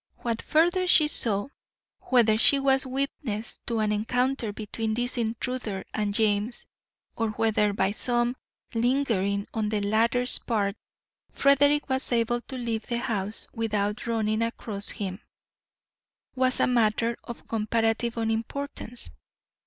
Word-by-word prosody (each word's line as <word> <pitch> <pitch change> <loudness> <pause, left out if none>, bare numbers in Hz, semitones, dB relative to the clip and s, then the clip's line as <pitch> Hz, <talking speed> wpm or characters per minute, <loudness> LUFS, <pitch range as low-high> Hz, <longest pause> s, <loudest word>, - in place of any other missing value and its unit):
What 230 -1 -2
further 350 +4 +2
she 310 -4 +5
saw, 220 -5 -1 0.5
whether 235 -4 +3
she 255 +5 +5
was 270 -1 +3
witness 260 -4 -3
to 230 -2 0
an 210 -1 +1
encounter 245 +2 0
between 220 +1 -3
this 245 +2 0
intruder 230 -3 -3
and 210 -1 -1
James, 210 +2 +1 0.5
or 225 -1 0
whether 215 -1 +1
by 195 -1 +1
some 240 +2 0 0.4
lingering 225 -5 +1
on 220 -2 -1
the 210 -1 0
latter's 230 +4 +3
part 205 -4 -1 0.6
Frederick 285 +1 +3
was 265 0 0
able 240 0 +1
to 260 - -6
leave 230 -3 -3
the 235 - -1
house 220 -4 0
without 210 -1 -1
running 220 -1 0
across 220 -3 -2
him, 195 -1 -5 1.1
was 255 -1 +1
a - - +4
matter 230 -1 +2
of 235 - -9
comparative 225 +1 0
unimportance. 230 +2 -3
230 Hz, 130 wpm, -27 LUFS, 215-250 Hz, 1.1 s, she